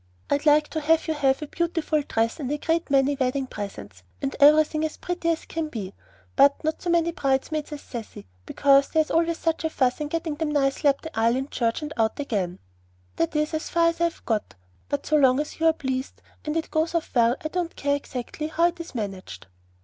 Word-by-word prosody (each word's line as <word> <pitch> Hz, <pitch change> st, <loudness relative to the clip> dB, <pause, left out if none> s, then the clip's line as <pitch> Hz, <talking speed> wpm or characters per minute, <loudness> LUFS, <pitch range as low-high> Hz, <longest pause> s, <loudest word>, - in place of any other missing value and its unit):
I'd 285 Hz, +2 st, +1 dB
like 300 Hz, 0 st, +5 dB
to 315 Hz, -, -3 dB
have 320 Hz, +2 st, +2 dB
you 320 Hz, -, +1 dB
have 275 Hz, -1 st, +1 dB
a -, -, -6 dB
beautiful 330 Hz, -1 st, 0 dB
dress 230 Hz, -3 st, -1 dB
and 275 Hz, -2 st, -3 dB
a 295 Hz, -, 0 dB
great 325 Hz, +2 st, -1 dB
many 275 Hz, +1 st, +3 dB
wedding 265 Hz, 0 st, 0 dB
presents 105 Hz, -, -8 dB, 0.2 s
and 135 Hz, -, -3 dB
everything 305 Hz, +2 st, +5 dB
as 315 Hz, -, -3 dB
pretty 355 Hz, -1 st, -2 dB
as 330 Hz, -1 st, -1 dB
can 325 Hz, -1 st, -3 dB
be, 210 Hz, -9 st, -6 dB, 0.4 s
but 280 Hz, +3 st, +4 dB
not 315 Hz, +1 st, -1 dB
so 355 Hz, -, -3 dB
many 340 Hz, 0 st, +2 dB
bridesmaids 290 Hz, +1 st, -1 dB
as 295 Hz, -1 st, -6 dB
Cecy, 230 Hz, -, -8 dB, 0.2 s
because 275 Hz, -1 st, +4 dB
there 320 Hz, -, +3 dB
is -, -, -10 dB
always 330 Hz, 0 st, +2 dB
such 325 Hz, 0 st, -1 dB
a 320 Hz, -, +1 dB
fuss 260 Hz, -2 st, 0 dB
in 300 Hz, -, -1 dB
getting 325 Hz, 0 st, -2 dB
them 305 Hz, +1 st, -2 dB
nicely 285 Hz, 0 st, +2 dB
up 275 Hz, -, 0 dB
the 320 Hz, -, -9 dB
aisle 230 Hz, +2 st, +3 dB
in 270 Hz, +2 st, -3 dB
church 230 Hz, +4 st, -1 dB
and 300 Hz, 0 st, -5 dB
out 220 Hz, +2 st, +1 dB
again, 195 Hz, -10 st, -2 dB, 0.6 s
that 165 Hz, -, 0 dB
is 300 Hz, +1 st, 0 dB
as 315 Hz, +1 st, -3 dB
far 335 Hz, -1 st, +3 dB
as 335 Hz, 0 st, -5 dB
I've 340 Hz, -1 st, -1 dB
got. 220 Hz, -3 st, -2 dB, 0.3 s
But 285 Hz, -1 st, -2 dB
so 305 Hz, -, +3 dB
long 265 Hz, -2 st, +4 dB
as 300 Hz, +1 st, -4 dB
you 325 Hz, -, +3 dB
are 325 Hz, -, +5 dB
pleased, 260 Hz, -3 st, -4 dB, 0.2 s
and 300 Hz, +1 st, -1 dB
it 325 Hz, -, -3 dB
goes 320 Hz, +2 st, 0 dB
off 330 Hz, -, -2 dB
well, 235 Hz, 0 st, +4 dB
I -, -, 0 dB
don't 350 Hz, 0 st, -3 dB
care 285 Hz, 0 st, 0 dB
exactly 280 Hz, +2 st, -5 dB
how 335 Hz, +2 st, +2 dB
it 345 Hz, -, -11 dB
is 335 Hz, -5 st, -8 dB
managed." 195 Hz, -, -5 dB
295 Hz, 225 wpm, -25 LUFS, 260-320 Hz, 0.6 s, like